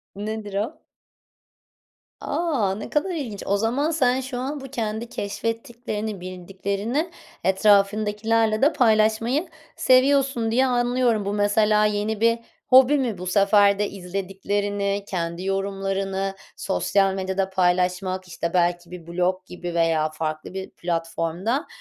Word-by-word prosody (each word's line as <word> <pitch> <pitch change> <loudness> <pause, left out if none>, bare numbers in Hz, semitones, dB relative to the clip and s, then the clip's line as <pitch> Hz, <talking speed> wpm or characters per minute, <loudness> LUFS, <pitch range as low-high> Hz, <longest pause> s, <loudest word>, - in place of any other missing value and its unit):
Nedir 210 0 -5
o? 215 +10 -4 1.3
A! 275 - 0
Ne 210 - -7
kadar 300 +6 0
ilginç. 235 -10 -5
O 200 - +1
zaman 250 +9 0
sen 260 -5 +2
şu 260 -1 -5
an 280 +4 -3
bu 270 - -8
kendi 230 -3 -3
keşfettiklerini, 220 -1 -4
bildiklerini 200 - -3 0.3
etrafındakilerle 210 +3 +2
de 295 +4 +4
paylaşmayı 225 +6 +2 0.3
seviyorsun 260 -3 +3
diye 255 +3 +3
anlıyorum. 245 -3 +1
Bu 200 - -1
mesela 210 +1 +3
yeni 210 +1 -1
bir 230 0 +3 0.3
hobi 265 +3 +6
mi? 245 -7 -1
Bu 180 +1 -6
sefer 200 +1 +4
de 205 - 0
izlediklerini, 200 +2 -2
kendi 170 -1 -3
yorumlarını, 195 0 -2 0.2
sosyal 195 0 +1
medyada 190 0 -1
paylaşmak, 185 0 0
işte, 170 -1 -4
belki 175 -1 +1
bir 175 -2 -9
blog 180 +2 -1
gibi 175 -1 -6
veya 165 -2 +2
farklı 155 +1 -4
bir 190 0 -5
platformda, 170 - -2
205 Hz, 125 wpm, -24 LUFS, 190-230 Hz, 1.3 s, hobi